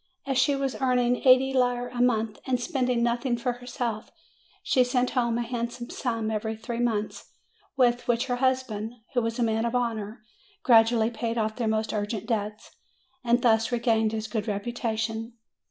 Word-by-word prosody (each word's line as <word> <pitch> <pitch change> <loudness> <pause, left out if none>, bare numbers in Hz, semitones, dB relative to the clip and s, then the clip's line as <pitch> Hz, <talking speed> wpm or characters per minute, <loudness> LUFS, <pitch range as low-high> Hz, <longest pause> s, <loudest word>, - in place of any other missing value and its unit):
As 270 -1 0
she 280 +2 +3
was 275 -1 -3
earning 250 -1 +2
eighty 260 +1 +6
lire 245 -1 +1
a 245 - -3
month 225 -3 +1
and 255 -1 +1
spending 250 -1 0
nothing 240 +1 0
for 245 +1 -1
herself, 245 -2 -4 0.5
she 255 - +3
sent 250 0 0
home 235 -2 +1
a 240 - -1
handsome 240 0 -4
sum 230 -3 -2
every 220 +1 -2
three 230 +2 -5
months, 225 -3 -2 0.4
with 245 -2 +2
which 240 +1 +1
her 245 -2 -1
husband, 245 -4 -1 0.2
who 245 - +2
was 230 0 -2
a 245 - +1
man 225 0 +1
of 235 +1 -1
honor, 225 -2 -2 0.4
gradually 225 -1 +5
paid 230 0 -3
off 215 -1 -1
their 235 -3 -1
most 220 0 0
urgent 210 0 -3
debts, 210 -2 -3 0.5
and 240 0 +2
thus 225 0 +3
regained 225 -2 +2
his 220 -1 -3
good 215 -1 -3
reputation. 225 +1 -3
235 Hz, 170 wpm, -26 LUFS, 220-245 Hz, 0.5 s, eighty